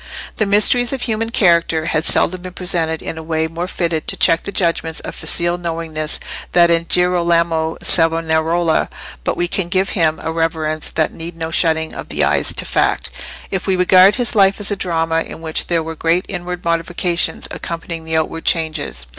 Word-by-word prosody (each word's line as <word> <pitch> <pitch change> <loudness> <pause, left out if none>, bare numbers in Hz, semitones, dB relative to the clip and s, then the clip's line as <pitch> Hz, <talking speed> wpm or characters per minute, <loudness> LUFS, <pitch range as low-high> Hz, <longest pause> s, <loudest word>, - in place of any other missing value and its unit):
The 215 - +1
mysteries 215 +4 +4
of 265 - -3
human 225 -1 -1
character 170 -6 +2
have 160 -1 0
seldom 185 +1 +1
been 185 0 -8
presented 170 -4 0
in 160 - -5
a - - -6
way 160 0 -1
more 165 +2 -4
fitted 170 -4 -2
to - - +2
check 165 +1 +4
the - - -6
judgments 165 -3 0
of - - -7
facile 175 +1 -2
knowingness 165 -2 -4 0.3
than 170 -1 +5
in 170 0 +2
Girolamo 170 -2 +1
Savonarola; 165 0 +2 0.3
but - - -1
we 175 - 0
can 175 0 -1
give 190 +1 +1
him 160 -4 +1
a 160 - -2
reverence 160 -1 -2
that 160 - -1
needs 165 +1 -8
no 165 0 -4
shutting 160 -1 +1
of - - -8
the 75 0 0
eyes 70 0 +2
to - - -2
fact, - - 0 0.4
if 190 0 -3
we 190 - +2
regard 185 +2 +6
his 245 -2 -1
life 195 -1 +3
as 205 0 -1
a - - +1
drama 165 -3 0
in - - -7
which 160 -1 +1
there 170 -2 0
were 160 0 -5
great 165 +3 0
inward 180 -1 -5
modifications 170 +1 0
accompanying 165 -1 -5
the 160 0 -1
outward 165 +1 -2
changes. 160 - -1
165 Hz, 190 wpm, -18 LUFS, 160-180 Hz, 0.4 s, regard